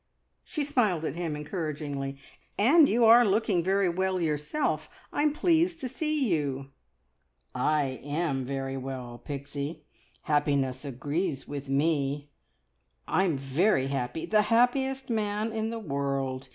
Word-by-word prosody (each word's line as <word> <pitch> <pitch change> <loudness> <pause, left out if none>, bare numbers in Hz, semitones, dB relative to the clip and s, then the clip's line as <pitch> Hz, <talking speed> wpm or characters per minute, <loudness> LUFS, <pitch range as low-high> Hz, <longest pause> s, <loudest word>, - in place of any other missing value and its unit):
She 305 -5 -3
smiled 215 - +1
at - - -3
him 170 -3 -2
encouragingly. 150 -3 -4 0.4
"And 285 +8 +6
you 235 +1 +4
are 235 +2 +8
looking 200 -4 +2
very 195 +1 +2
well 185 +1 0
yourself. 155 - -1 0.2
I'm 295 +1 +2
pleased 330 +2 +2
to 260 - -2
see 300 0 0
you!" 140 -6 -1 0.8
"I 135 0 0
am 145 -2 -1
very 135 0 -3
well, 125 -3 -6
Pixie. 140 +2 -5 0.4
Happiness 140 -3 +1
agrees 145 +3 -2
with 140 -1 -6
me. 145 0 0 0.8
I'm 185 -6 +2
very 135 +2 +1
happy 135 +3 -2
the 215 -1 +4
happiest 265 +3 +2
man 215 0 -1
in 220 0 -1
the 230 - -4
world! 135 -7 -2
155 Hz, 125 wpm, -28 LUFS, 140-220 Hz, 0.8 s, are